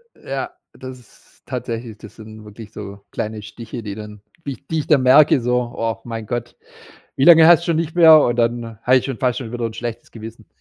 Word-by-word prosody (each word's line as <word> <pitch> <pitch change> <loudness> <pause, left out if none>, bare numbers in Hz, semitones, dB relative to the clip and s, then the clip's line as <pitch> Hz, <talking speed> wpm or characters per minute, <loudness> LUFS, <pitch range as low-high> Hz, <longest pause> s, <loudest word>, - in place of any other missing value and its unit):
Ja, 135 -1 -6 0.2
das 130 -1 -10
ist 120 - -24
tatsächlich 115 -1 -6
das 110 - -14
sind 110 -1 -13
wirklich 105 0 -12
so 100 -2 -10
kleine 110 0 -5
Stiche, 115 +3 -9
die 100 -2 -6
dann 105 -1 -10 0.2
die 140 - -3
ich 135 +1 -12
die 160 - -2
ich 150 - -5
dann 150 -4 +4
merke, 135 +1 +5
so: 125 0 -1
„Oh 115 0 -2
mein 115 -2 -6
Gott, 120 +1 -5 0.6
wie 135 - +1
lange 165 -1 +8
hast 170 -1 +7
du - - -7
schon 170 - +1
nicht 160 0 -3
mehr.“ 160 -3 +8
und 120 -4 +1
dann 115 -2 -2
habe 130 +2 +4
ich 130 - +1
schon 135 -3 -4
fast 125 -2 0
schon 120 -3 -8
wieder 120 -1 -4
'n 115 - -3
schlechtes 115 0 -7
Gewissen. 110 0 -11
120 Hz, 225 wpm, -19 LUFS, 110-135 Hz, 0.6 s, lange